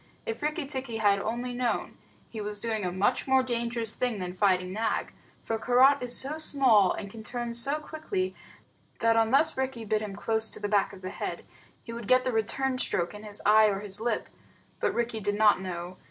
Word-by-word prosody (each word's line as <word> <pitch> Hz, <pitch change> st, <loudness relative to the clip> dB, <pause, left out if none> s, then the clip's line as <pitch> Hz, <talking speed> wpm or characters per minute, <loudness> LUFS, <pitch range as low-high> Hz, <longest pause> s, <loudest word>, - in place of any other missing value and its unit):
If 225 Hz, 0 st, -4 dB
Rikki 300 Hz, +1 st, -1 dB
tikki 260 Hz, -4 st, -4 dB
had 205 Hz, -2 st, +3 dB
only 240 Hz, +4 st, -3 dB
known, 245 Hz, -1 st, -2 dB, 0.3 s
he 220 Hz, -, -7 dB
was 210 Hz, 0 st, -4 dB
doing 220 Hz, -1 st, +1 dB
a 180 Hz, -, -1 dB
much 200 Hz, +9 st, +1 dB
more 265 Hz, 0 st, +4 dB
dangerous 235 Hz, -2 st, -2 dB
thing 245 Hz, -3 st, -1 dB
than 180 Hz, -2 st, -4 dB
fighting 185 Hz, -2 st, +2 dB
Nag, 220 Hz, +2 st, -1 dB, 0.3 s
for 225 Hz, 0 st, -2 dB
Karait 260 Hz, +4 st, +5 dB
is 245 Hz, -1 st, -2 dB
so 285 Hz, +4 st, -2 dB
small, 255 Hz, -, +4 dB
and 200 Hz, -, -6 dB
can 220 Hz, +3 st, -10 dB
turn 240 Hz, +1 st, -4 dB
so 275 Hz, +5 st, +1 dB
quickly, 345 Hz, +5 st, -3 dB, 0.6 s
that 230 Hz, 0 st, +3 dB
unless 230 Hz, +7 st, +3 dB
Rikki 260 Hz, -3 st, -3 dB
bit 215 Hz, 0 st, 0 dB
him 205 Hz, -2 st, -5 dB
close 220 Hz, +1 st, 0 dB
to -, -, -4 dB
the 205 Hz, -, -2 dB
back 205 Hz, -1 st, +2 dB
of 190 Hz, -2 st, -13 dB
the 185 Hz, -, -4 dB
head, -, -, -5 dB, 0.4 s
he 230 Hz, -, -8 dB
would 235 Hz, -2 st, -7 dB
get 255 Hz, 0 st, +5 dB
the 255 Hz, -, 0 dB
return 255 Hz, +4 st, -1 dB
stroke 175 Hz, -8 st, +1 dB
in 210 Hz, -, -9 dB
his 210 Hz, -1 st, -4 dB
eye 215 Hz, +1 st, +7 dB
or 200 Hz, -1 st, -1 dB
his 205 Hz, 0 st, -3 dB
lip. 230 Hz, -1 st, -1 dB, 0.5 s
But -, -, 0 dB
Rikki 235 Hz, -1 st, -1 dB
did 205 Hz, 0 st, -1 dB
not 210 Hz, -3 st, +4 dB
know. 180 Hz, -1 st, -6 dB
225 Hz, 210 wpm, -28 LUFS, 205-255 Hz, 0.6 s, eye